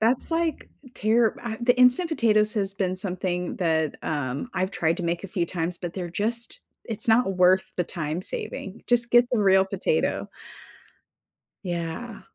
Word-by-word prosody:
That's 240 +7 +1
like, 330 -2 -1 0.3
tear, 225 +1 +2
ah 230 -2 -4
the 245 +1 +3
instant 250 +8 +5
potatoes 215 -7 +3
has 195 -2 0
been 185 -2 -1
something 180 -1 -3
that, 160 -3 0
um, 145 - -3
I've 185 +1 0
tried 165 -3 0
to - - -3
make 170 +2 -2
a 195 - -5
few 175 -3 -1
times, 170 0 -3
but 175 -2 -5
they're 180 -3 -4
just 230 +6 -2 0.2
it's 225 +2 -3
not 225 -4 +3
worth 185 +1 +5
the 180 - +1
time 160 -1 -4
saving, 195 +2 -5
just 240 -1 +2
get 240 0 +7
the 245 - +1
real 190 -2 +5
potato. 470 - -1 1.4
Yeah. 175 +6 -4
195 Hz, 165 wpm, -25 LUFS, 175-235 Hz, 1.4 s, get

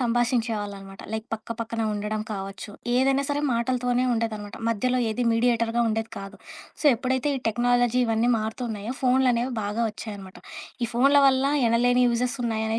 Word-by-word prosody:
సంభాషించేవాళ్ళనమాట. 225 -5 -1
Like 220 0 -4
పక్క 225 +1 -6
పక్కన 230 0 -3
ఉండడం 210 +1 -3
కావచ్చు. 195 0 -6 0.3
ఏదైనా 270 +2 +2
సరే 290 0 0
మాటలతోనే 245 +1 0
ఉండేదనమాట. 215 -3 -3
మధ్యలో 250 +3 +1
ఏది 240 +3 -1
మీడియేటర్‌గా 230 0 +1
ఉండేది 225 0 -2
కాదు. 195 +1 -9 0.4
సో, - - -8
ఎప్పుడైతే 260 +3 -1
ఈ - - -3
టెక్నాలజీ 245 +1 +2
ఇవన్నీ 225 +2 +2
మారుతూ 220 +3 -4
ఉన్నాయో 215 +4 -5
ఫోన్లనేవి 255 -1 +2
బాగా 210 +3 -2
ఒచ్చాయనమాట. 200 -3 -9 0.5
ఈ - - -3
ఫోన్ల 275 +4 +5
వల్ల 265 0 +3 0.2
ఎనలేని 245 +2 +3
యూజెస్ 245 +2 0
ఉన్నాయనే 220 -1 -1
230 Hz, 145 wpm, -25 LUFS, 220-250 Hz, 0.5 s, ఫోన్ల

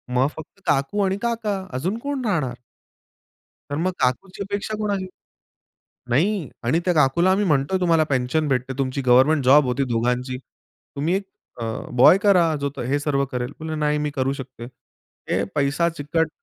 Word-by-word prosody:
मग 130 +2 +4
फक्त 160 +5 -11
काकू 145 +8 +1
आणि 190 0 0
काका, 220 -5 -2
अजून 175 - -2
कोण 285 -2 -3
राहणार? 155 - 0 1.2
तर - - -1
मग 180 +4 0
काकूची 185 +11 -1
अपेक्षा 200 +2 -3
कोणाची 200 -3 -2 1.0
नाही 170 - +1 0.2
आणि 130 +8 +2
त्या 180 - +2
काकूला 155 +5 +3
आम्ही 200 +2 +2
म्हणतोय 150 +1 +1
तुम्हाला 165 -3 +3
पेन्शन 135 +4 0
भेटते 130 -1 -1
तुमची 135 0 -1
गव्हर्नमेंट 130 +4 +5
जॉब 140 +3 +6
होती 125 +2 0
दोघांची. 125 +2 0
"तुम्ही 145 +4 -6
एक 195 - -2 0.4
अ, - - -2 0.3
बॉय 130 +9 +7
करा, 180 -6 +4
जो 140 - 0
तो - - -4
हे 135 +4 0
सर्व 140 -2 0
करेल." 125 -1 -3
म्हणलं 160 -1 -4
"नाही 150 0 +1
मी 150 0 -1
करू 135 0 0
शकते." 130 -3 -8 0.7
हे - - +1
पैसा 145 +4 +1
चिकट 160 +1 -1
150 Hz, 165 wpm, -23 LUFS, 130-185 Hz, 1.2 s, बॉय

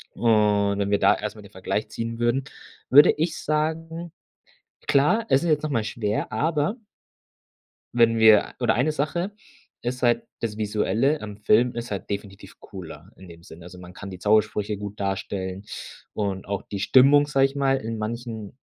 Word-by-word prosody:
und 105 -3 +2
wenn 100 0 0
wir 100 - +3
da - - +4
erst - - -5
mal - - -11
den - - -15
Vergleich - - -3
ziehen 115 0 -5
würden, 120 +3 +1 0.5
würde 145 +3 +8
ich 160 +2 -2
sagen, 160 +2 -2 0.8
klar, 150 +12 +3
es 135 - +3
ist 170 - -1
jetzt 150 -1 +2
noch 155 - -3
mal 115 -6 0
schwer, 105 -1 -3
aber 155 +5 0 1.2
wenn 115 -1 +4
wir 110 -2 +5
oder 120 - +2
eine 135 +6 +1
Sache 170 +6 -2 0.5
ist 125 +1 -4
halt 120 -1 +3 0.2
das 110 -2 -4
Visuelle 110 +7 +1
im 105 -1 -8
Film 115 +4 +2
ist 120 -1 -5
halt 100 - -5
definitiv 100 0 -7
cooler 85 -1 -11
in 95 - -14
dem 85 0 -14
Sinne. 85 0 -13
Also 90 0 -11
man 90 0 -12
kann 100 - -9
die 95 - -8
Zaubersprüche 105 0 +1
gut 105 +1 -8
darstellen 95 0 -4 0.5
und 100 -3 -3
auch 100 -1 -3
die 100 - -6
Stimmung, 140 +7 +5
sage 135 -2 +3
ich 135 +1 -3
mal, 135 -1 +2
in 115 -2 -5
manchen 115 0 -5
115 Hz, 175 wpm, -24 LUFS, 100-135 Hz, 1.2 s, würde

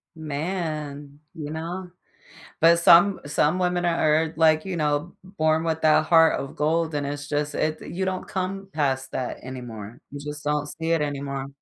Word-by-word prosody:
Man, 150 -2 -4 0.2
you 150 -3 -6
know, 175 +3 -5 0.7
but 170 +1 +7
some 175 +3 +6
some 150 +3 +1
women 180 -1 0
are 160 -2 +3
are, 160 - -7
like, 155 0 +4
you 185 -3 -3
know, 150 +2 -1
born 160 -4 0
with 160 -1 -1
that 155 0 +4
heart 165 -1 +5
of 135 - -7
gold 160 +2 0
and 145 -1 -1
it's 145 0 -5
just 150 0 -2
it 155 0 -1
you 190 +2 -4
don't 185 -1 -3
come 195 +1 -4
past 135 -3 -1
that 130 - -3
anymore, 120 -3 -8
you 145 - -7
just 150 +1 -7
don't 150 0 0
see 165 +2 -3
it 165 -2 +2
anymore. 140 -2 -3
155 Hz, 175 wpm, -24 LUFS, 145-170 Hz, 0.7 s, but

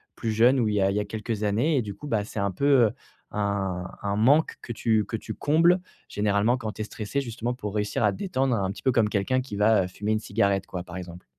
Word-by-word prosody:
plus 115 - -2
jeune 120 +4 +4
ou 115 - +2
il 105 - -1
y 100 - +2
a 95 - +3
il 100 - -1
y - - +2
a 105 - -2
quelques 110 0 -4
années, 120 +9 +2
et - - +3
du 100 -1 -6
coup 145 - -9
bah, 110 -6 0
c'est 105 - -6
un 100 -1 0
peu, 140 +10 -2 0.2
heu, 105 - +1 0.4
un 100 -3 -1 0.2
un 100 0 -1
manque 140 +9 +3
que 120 - -5
tu 110 -2 +1
que 115 -2 -3
tu - - -7
combles 165 +5 +3 0.3
généralement 105 +4 +1
quand 110 -4 -4
tu 110 - -7
es - - -2
stressé? 110 +6 -3
Justement 120 -1 -3
pour 105 -4 -6
réussir 105 +2 -1
à 105 - +4
te 95 - -7
détendre 135 -10 0
un 95 -2 -1
petit - - -9
peu, 130 - +3
comme 115 -3 +3
quelqu'un 105 +6 +1
qui 125 -5 -7
va, 105 -1 +4
heu, - - -5
fumer 105 +4 -2
une 110 - +1
cigarette, 100 -3 0
quoi, 90 - -5
par 90 0 -9
exemple? 90 -1 -9
105 Hz, 275 wpm, -26 LUFS, 100-120 Hz, 0.4 s, jeune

